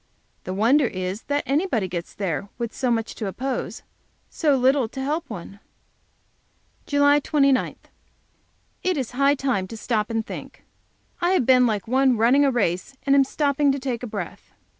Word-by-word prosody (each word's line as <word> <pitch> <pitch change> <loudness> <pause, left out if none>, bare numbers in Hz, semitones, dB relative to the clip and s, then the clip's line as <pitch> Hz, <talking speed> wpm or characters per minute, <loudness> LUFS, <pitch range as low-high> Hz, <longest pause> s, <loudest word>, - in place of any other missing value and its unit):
The 185 - -3
wonder 245 +7 +4
is 185 +1 -4
that 285 0 0
anybody 275 - 0
gets 170 -1 -6
there 195 0 -3
with 235 -1 -4
so 260 -2 -1
much 225 -2 -1
to 215 - -5
oppose 260 +7 -4 0.5
so 295 -4 +2
little 260 -1 +3
to 265 - -8
help 295 +3 -2
one! 200 -1 -8 1.3
JULY 285 0 +4
29. 275 -3 +2 1.1
It 365 -3 0
is 260 -4 -3
high 275 +3 +3
time 255 -9 -1
to 225 - -8
stop 215 -1 -1
and 225 -1 -1
think. - - -9 0.6
I 350 +2 +2
have 320 -10 +2
been 250 -1 +5
like 210 -3 -2
one 260 0 +3
running 245 +6 +4
a 280 - +4
race, 220 -1 -1
and 275 0 +4
am 275 - +6
stopping 285 +1 +1
to - - -2
take 255 -3 -3
breath. 205 -8 -6
255 Hz, 165 wpm, -23 LUFS, 215-280 Hz, 1.3 s, am